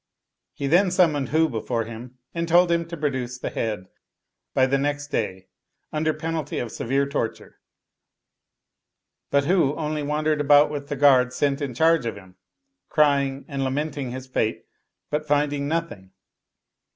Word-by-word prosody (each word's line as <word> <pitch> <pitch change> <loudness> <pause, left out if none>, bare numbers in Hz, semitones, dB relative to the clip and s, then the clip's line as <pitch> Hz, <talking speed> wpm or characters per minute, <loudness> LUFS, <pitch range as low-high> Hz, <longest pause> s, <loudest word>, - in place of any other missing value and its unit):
He 140 - -4
then 175 +7 +4
summoned 165 -7 +2
Hu 160 +1 +3
before 115 -2 -2
him, 120 +3 -9 0.2
and 170 0 -2
told 175 +1 +5
him 170 -1 +1
to 170 0 -7
produce 130 -4 -2
the - - -5
head 105 -5 -3 0.7
by 130 - +5
the 135 +1 +1
next 145 +1 -2
day 95 -7 -2 0.5
under 155 +1 +1
penalty 160 -2 -4
of 120 -3 -3
severe 135 +3 0
torture; 115 -5 -4 1.7
but 140 0 +2
Hu 160 -4 +2
only 150 -1 -2
wandered 150 +1 0
about 145 +1 +5
with 145 -1 -5
the 145 - -3
guard 130 -3 +5
sent 140 +2 0
in 135 -4 -3
charge 160 -2 +3
of 115 - -3
him, 95 -2 -14 0.5
crying 140 -2 +2
and 140 -2 -3
lamenting 140 0 -2
his 130 +1 -6
fate, 120 -4 -2 0.5
but 150 +1 -2
finding 145 -1 +1
nothing. 160 - -3
145 Hz, 150 wpm, -24 LUFS, 130-155 Hz, 1.7 s, told